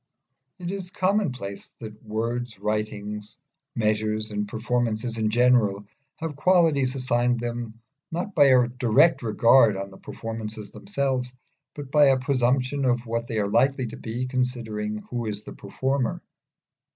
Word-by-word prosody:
It 180 -1 -5
is 195 -2 -5
a - - -28
commonplace 140 - -1
that 110 -2 -10
words, 115 +1 -3
writings, 105 +1 -4 0.4
measures, 110 -1 0
and 105 0 -2
performances 115 +1 -1
in 110 -1 +1
general, 110 -4 +3 0.3
have 160 -2 -5
qualities 150 -5 +3
assigned 125 -2 +1
them 120 -1 -5 0.3
not 175 +5 -3
by 145 -5 +6
a 130 -3 +5
direct 125 +6 +3
judgment 115 -1 +5
on 100 0 -5
the 95 - -14
performances 110 -2 -6
themselves, 135 -9 -2 0.4
but 140 -2 -8
by 150 -1 +6
a 135 -1 +5
presumption 130 +1 +1
of 120 -1 +1
what 115 0 -2
they 115 - -3
are 105 -1 +1
likely 130 +5 +2
to 115 - -7
be, 120 +3 -4
considering 115 -5 -2
who 120 -2 -2
is 105 0 -4
the - - -9
performer. 130 +5 -2
120 Hz, 145 wpm, -25 LUFS, 110-130 Hz, 0.4 s, by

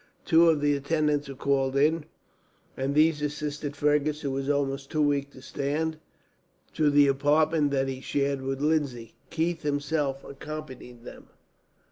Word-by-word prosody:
Two 165 +1 +5
of 155 -3 +2
the 145 0 +2
attendants 150 0 0
were 135 - -7
called 135 0 0
in, 150 +2 +2 0.7
and 135 +2 -2
these 155 0 +3
assisted 150 0 -4
Fergus, 150 +1 +1
who 140 - -2
was 135 +1 -3
almost 140 -1 -1
too 155 -1 +1
weak 140 -1 +1
to 130 -2 -15
stand, 155 +3 -2 0.7
to 155 -2 +2
the 145 0 +5
apartment 145 +2 +2
that 135 -1 0
he 130 -1 -5
shared 140 0 -1
with 135 +1 -3
Lindsay. 140 -7 -1 0.2
Keith 165 0 -1
himself 145 -1 -1
accompanied 130 -4 -9
them. - - -12
145 Hz, 150 wpm, -27 LUFS, 135-150 Hz, 0.7 s, Two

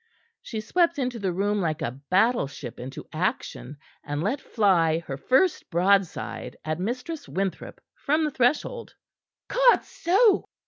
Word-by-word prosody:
She 220 -2 -5
swept 335 +8 +1
into 250 -3 -2
the 195 -3 -1
room 205 +3 0
like 160 -4 -1
a 115 - -1
battleship 145 - 0
into 130 +2 -7
action, 155 - -3 0.3
and 145 +1 -3
let 250 +9 -1
fly 175 -7 +2
her 135 - -4
first 265 - +1
broadside 190 +1 0
at 155 +1 -2
Mistress 250 - -4
Winthrop 195 -1 -3
from 310 +2 0
the 300 - -1
threshold. 290 - 0 0.5
"Codso!" 460 -4 +3
205 Hz, 130 wpm, -26 LUFS, -, 0.5 s, Codso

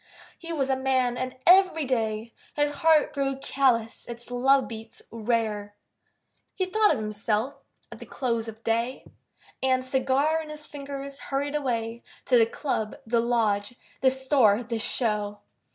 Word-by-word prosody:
He 335 -1 -7
was 275 -4 0
a - - +3
man. 260 -2 +1
And 255 +1 -4
every 360 -4 +5
day 225 -3 -2 0.2
His 290 0 +2
heart 320 -2 +4
grew 275 -1 -1
callous, 250 -4 0
its 235 +1 -8
love 265 +2 +3
beats 225 -1 -9
rare, 215 -3 -2 0.8
He 370 - +1
thought 425 +3 +3
of 300 - +1
himself 215 +4 -1 0.4
at - - -9
the - - -10
close 230 -4 -2
of 225 0 -9
day, 230 +3 -1 0.6
And, 255 -1 +1
cigar 270 +4 +1
in 310 - -9
his 300 0 -6
fingers, 280 -1 -7
hurried 285 +1 -1
away 235 -5 -2 0.2
To 255 - +3
the 225 - +5
club, 225 -4 -3
the 230 +1 +1
lodge, 230 -2 0 0.2
the 265 - +5
store, 260 -5 +3
the 230 -1 -3
show. 210 -3 0
255 Hz, 150 wpm, -26 LUFS, 225-275 Hz, 0.8 s, every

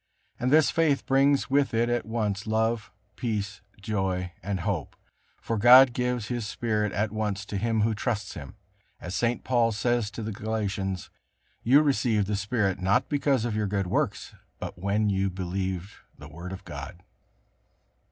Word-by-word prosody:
And 125 - 0
this 155 0 +5
faith 155 -4 +2
brings 135 0 +3
with 140 -3 +2
it 115 +1 +2
at 120 -1 -1
once 105 -2 -2
love, 110 0 0 0.2
peace, 105 -4 -3 0.2
joy 95 -3 -2
and 95 0 -3
hope. 85 -5 -3 0.4
For 115 -2 -2
God 125 +3 +8
gives 125 -2 -1
His 120 -3 -3
Spirit 105 -3 -1
at 105 +2 -1
once 105 -2 -2
to 105 - -6
him 110 +2 +1
who 110 +1 +2
trusts 105 -1 -2
Him, 70 -7 -9 0.4
as 90 - -6
St. 120 +3 0
Paul 120 -3 +2
says 115 +1 0
to 110 +2 -7
the 110 - -3
Galatians: 100 -3 -3 0.5
"You 140 +6 +5
received 120 -7 +2
the 105 +1 -1
Spirit 105 -2 0
not 95 +2 +2
because 140 -5 +1
of 115 -3 -2
your 105 -1 0
good 100 -1 -1
works, 90 - -1 0.2
but - - -6
when 100 +3 +1
you 95 0 +1
believed 95 +1 -3 0.3
the 75 - -11
Word 85 +5 -8
of 95 +1 -7
God." 90 - -8
105 Hz, 165 wpm, -27 LUFS, 95-120 Hz, 0.5 s, God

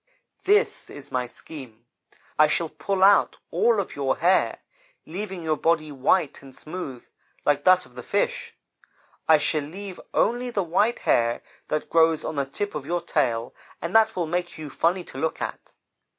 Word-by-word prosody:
This 420 +4 +3
is 145 -1 -10
my 125 -1 -1
scheme; 120 -4 -11 0.5
I 155 - +8
shall 165 +1 0
pull 195 +2 -1
out 200 0 +5
all 470 +2 +3
of - - -4
your - - 0
hair, - - +3 0.5
leaving 190 +1 -5
your 155 -1 0
body 160 -1 +1
white 145 +3 +1
and 135 -1 -13
smooth, 155 -7 -7 0.4
like 145 -1 +2
that 185 0 +6
of - - -20
the - - -8
fish. - - -1 0.7
I 160 - +7
shall 150 +1 0
leave 185 +6 -8
only 245 +1 +1
the 205 -5 0
white 205 +8 +2
hair 115 0 +1 0.2
that 155 - -2
grows 165 -1 +4
on 160 - -3
the 140 -1 -1
tip 205 +9 -3
of 145 -2 -5
your 175 +1 0
tail, 120 -8 0 0.3
and 170 +4 -5
that 220 0 +5
will 175 - 0
make 175 +2 -3
you 155 -3 -7
funny 175 +5 +1
to 135 - -9
look 160 +2 -1
at. - - -6
165 Hz, 175 wpm, -25 LUFS, 145-190 Hz, 0.7 s, I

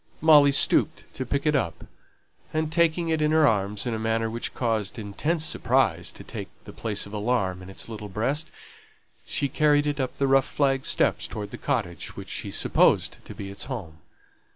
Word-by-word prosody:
Molly 150 -2 +7
stooped 140 - +3
to 130 - -4
pick 140 +3 -1
it 150 -1 +3
up, 105 -12 -2 0.7
and 155 0 -1
taking 170 0 +2
it 160 -1 +1
in 150 - +3
her 155 0 +5
arms 105 -3 +1
in 120 - -1
a 110 - -2
manner 115 0 0
which 115 +1 -4
caused 110 -4 -1
intense 150 +10 -2
surprise 120 - +1
to - - -11
take - - -7 0.2
the - - -11
place 105 -3 -2
of 100 - -11
alarm 105 -4 0
in 90 - -10
its 95 - -6
little 105 -2 -7
breast, 135 +10 -1 0.8
she 140 - 0
carried 145 0 +3
it 145 -1 -1
up 130 -1 -2
the 140 - +1
rough 135 -1 +4
flag 135 -2 0
steps - - +1
towards 105 -2 -6
the - - -7
cottage 105 - -2
which - - -8
she - - -4
supposed - - +2
to - - -9
be 100 -1 -7
its 100 - -7
home. 95 - -6
125 Hz, 195 wpm, -26 LUFS, 105-145 Hz, 0.8 s, Molly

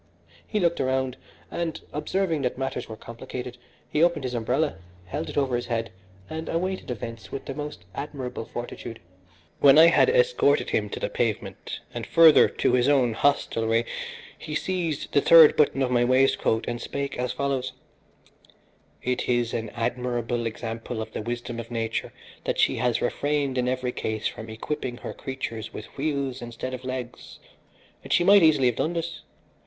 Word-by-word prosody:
He 210 - -1
looked 170 -2 +1
around 130 -1 0 0.4
and, 170 -2 -3
observing 165 +1 0
that 125 -2 -1
matters 135 -3 -3
were 110 - -6
complicated, 125 +2 -8 0.3
he 150 - 0
opened 170 -4 +3
his 125 -1 -3
umbrella, 125 - 0 0.3
held 145 - -4
it - - -7
over 135 -3 +2
his 120 - -3
head, 115 -3 -2 0.4
and 160 0 -5
awaited 185 +1 -2
events 115 -1 -6
with 135 - -5
the 135 - -4
most 150 -9 -6
admirable 135 -3 -5
fortitude. 120 -1 -7 0.6
When 140 0 +7
I 165 +1 +9
had 170 - +5
escorted - - +3
him - - 0
to - - -5
the - - -1
pavement, - - -3
and - - -5
further 165 -2 +7
to - - 0
his 125 +2 +3
own 130 -5 +3
hostelry, 115 -3 +1 0.5
he 150 - -5
seized 170 -4 -2
the 140 - +5
third 160 -1 +8
button 140 -2 +3
of 125 - 0
my 120 -1 +3
waistcoat 130 -3 +2
and 120 - -3
spake 140 -2 -4
as 125 0 -1
follows: 140 -2 -1 1.3
"It 125 0 -1
is 120 -1 +1
an 115 -2 -2
admirable 120 0 -2
example 115 +1 -5
of - - -13
the - - -3
wisdom 120 +1 -4
of 115 - -7
nature 115 -1 -2 0.3
that - - -1
she - - +3
has 120 0 +1
refrained 145 +1 0
in 125 -1 +1
every 130 -1 -1
case 110 -2 -3
from 110 0 -7
equipping 120 +2 -4
her - - -6
creatures 130 -4 -5
with 110 - -9
wheels 140 -3 -2
instead 120 +2 -6
of 130 0 -6
legs, 130 -1 -6 0.7
and - - -9
she 175 - +4
might 200 +2 +7
easily 155 -5 +5
have 125 -2 +2
done 160 - 0
this. 170 0 -4
130 Hz, 170 wpm, -26 LUFS, 120-150 Hz, 1.3 s, I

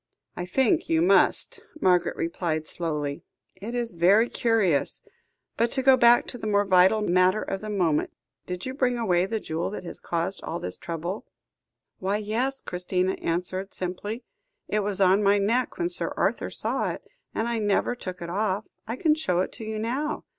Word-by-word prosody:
"I 180 - -5
think 260 +4 +1
you 160 - +3
must," 185 +3 +3 0.2
Margaret 180 - +3
replied 165 -2 -2
slowly. 150 -4 -3 0.4
"It 215 +6 -6
is 235 -4 -2
very 195 +7 +4
curious. 200 - +1 0.5
But, 235 +1 +2
to 265 - 0
go 265 0 +7
back 240 -1 +5
to 245 - -7
the 215 - -4
more 205 -1 +2
vital 190 +3 +5
matter 185 +1 +3
of 195 - -4
the 215 - -6
moment. 175 -7 +1 0.4
Did 180 0 -5
you 260 - -4
bring 255 -3 +1
away 185 -6 +2
the 220 +1 -2
jewel 165 -3 -3
which 200 - -6
has 170 - -7
caused 170 +3 -2
all - - -4
this 90 - -4
trouble?" 170 +4 -5 0.7
"Why, 195 +2 0
yes," 235 +6 -1
Christina 180 +1 -1
answered 180 +3 -2
simply. 205 +6 -4 0.4
"It 215 - 0
was 205 -1 -1
on 190 +1 +5
my 200 0 +4
neck 230 +6 0
when 345 - 0
Sir 355 - +2
Arthur - - 0
saw - - 0
it, - - -6 0.3
and 225 - 0
I 235 -1 -1
never 205 +2 +1
took 185 -7 -7
it 170 - -6
off. 205 +1 -1 0.2
I 230 - -3
can 310 +3 +3
show 185 - 0
it - - -3
to 225 - -8
you 220 0 -4
now." 260 +8 -2
200 Hz, 185 wpm, -26 LUFS, 180-225 Hz, 0.7 s, go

